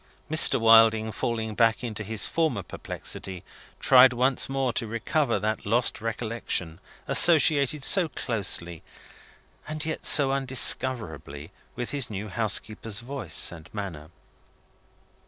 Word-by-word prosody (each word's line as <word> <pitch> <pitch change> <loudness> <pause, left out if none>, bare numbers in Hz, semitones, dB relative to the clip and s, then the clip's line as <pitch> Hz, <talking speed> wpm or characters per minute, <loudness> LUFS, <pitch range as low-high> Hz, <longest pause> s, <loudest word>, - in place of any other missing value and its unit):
Mr. 155 - +5
Wilding, 110 -1 +4
falling 110 -1 -4
back 115 +2 +1
into 110 -3 -5
his 110 +1 -1
former 155 - -2
perplexity, 95 +2 -5 0.4
tried 130 0 +6
once 130 +3 +1
more 135 -2 -2
to 115 - -2
recover 120 +7 -1
that 110 +1 -3
lost 115 +2 0
recollection, 115 -7 -4 0.3
associated 150 -4 +3
so 180 +2 +2
closely, 90 - -1 0.9
and 155 0 -3
yet 160 - -5
so 140 -2 +4
undiscoverably, 120 - 0 0.2
with 120 -1 -6
his 140 -5 -2
new 105 0 -6
housekeeper's 110 0 -2
voice 120 - -2
and 85 -1 -13
manner. 85 -7 -7
115 Hz, 120 wpm, -25 LUFS, 105-135 Hz, 0.9 s, tried